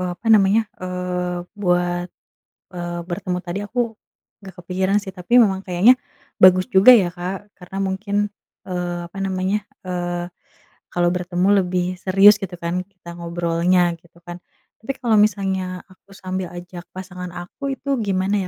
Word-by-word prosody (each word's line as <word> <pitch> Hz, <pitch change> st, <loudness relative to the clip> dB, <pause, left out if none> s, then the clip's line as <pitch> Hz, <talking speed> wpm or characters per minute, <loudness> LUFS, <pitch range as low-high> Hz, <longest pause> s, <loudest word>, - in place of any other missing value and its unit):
apa 230 Hz, -, -9 dB
namanya, 210 Hz, +1 st, +5 dB, 0.2 s
eee, 180 Hz, -1 st, -3 dB, 0.2 s
buat, 175 Hz, -2 st, +1 dB, 0.6 s
eee, 175 Hz, -1 st, -5 dB
bertemu 180 Hz, 0 st, -2 dB
tadi 175 Hz, +1 st, -4 dB
aku 235 Hz, +5 st, -7 dB, 0.6 s
nggak 190 Hz, -3 st, -12 dB
kepikiran 190 Hz, +3 st, +1 dB
sih 195 Hz, -, -7 dB
tapi 195 Hz, +7 st, +4 dB
memang 195 Hz, -3 st, 0 dB
kayaknya 195 Hz, +8 st, +5 dB, 0.4 s
bagus 185 Hz, 0 st, +6 dB
juga 195 Hz, +7 st, +8 dB
ya, 190 Hz, -7 st, +3 dB
Kak 185 Hz, +3 st, -6 dB
karena 180 Hz, +1 st, -10 dB
mungkin, 195 Hz, +1 st, -2 dB, 0.5 s
eee, 175 Hz, -1 st, -2 dB
apa 195 Hz, -, -10 dB
namanya, 195 Hz, +2 st, -1 dB, 0.2 s
eee, 175 Hz, -1 st, -3 dB, 0.6 s
kalau 175 Hz, 0 st, +1 dB
bertemu 180 Hz, +1 st, 0 dB
lebih 180 Hz, 0 st, -1 dB, 0.2 s
serius 195 Hz, +2 st, +7 dB
gitu 185 Hz, -2 st, -5 dB
kan 170 Hz, +2 st, -2 dB
kita 180 Hz, -2 st, -13 dB
ngobrolnya 170 Hz, +1 st, +1 dB
gitu 170 Hz, 0 st, -22 dB
kan. 175 Hz, 0 st, -8 dB, 0.4 s
Tapi 230 Hz, -, -2 dB
kalau 235 Hz, -3 st, +1 dB
misalnya 190 Hz, -3 st, +1 dB
aku 190 Hz, 0 st, -23 dB
sambil 185 Hz, -2 st, -4 dB
ajak 175 Hz, 0 st, -9 dB
pasangan 180 Hz, -1 st, -8 dB
aku 270 Hz, +11 st, -5 dB
itu 280 Hz, -1 st, -1 dB
gimana 195 Hz, -1 st, 0 dB
185 Hz, 145 wpm, -21 LUFS, 175-195 Hz, 0.6 s, juga